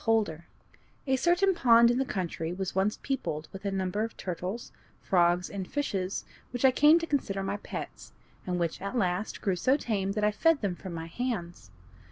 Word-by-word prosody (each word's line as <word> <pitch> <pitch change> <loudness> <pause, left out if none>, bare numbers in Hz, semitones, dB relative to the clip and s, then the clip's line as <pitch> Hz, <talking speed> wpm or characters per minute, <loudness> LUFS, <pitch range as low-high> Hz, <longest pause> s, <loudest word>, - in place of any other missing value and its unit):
Holder 205 -8 +1 0.6
A 265 -1 +2
certain 350 +8 +3
pond 235 -6 +6
in 245 - 0
the 270 - +1
country 175 -9 -3
was 190 0 -3
once 195 +3 +1
peopled 205 - -2
with 195 +1 -9
a - - +1
number 190 +2 -1
of 225 - -5
turtles, 185 +5 -4 0.3
frogs, 175 0 +2
and 195 -2 -6
fishes 195 -10 -2 0.2
which 245 +1 -1
I 265 - +7
came 295 +5 +6
to 335 - -1
consider 200 -11 -1
my 195 +1 -2
pets, - - -7 0.4
and 180 -1 -1
which 170 -2 -2
at 200 +5 -3
last 185 -1 -1
grew 195 -2 +1
so 255 +10 +2
tame 200 -7 -1
that 210 0 -2
I 210 - +4
fed 310 +8 +3
them 200 -4 0
from 180 -1 -7
my 165 0 -5
hands. 175 -2 -4
200 Hz, 195 wpm, -29 LUFS, 180-250 Hz, 0.6 s, I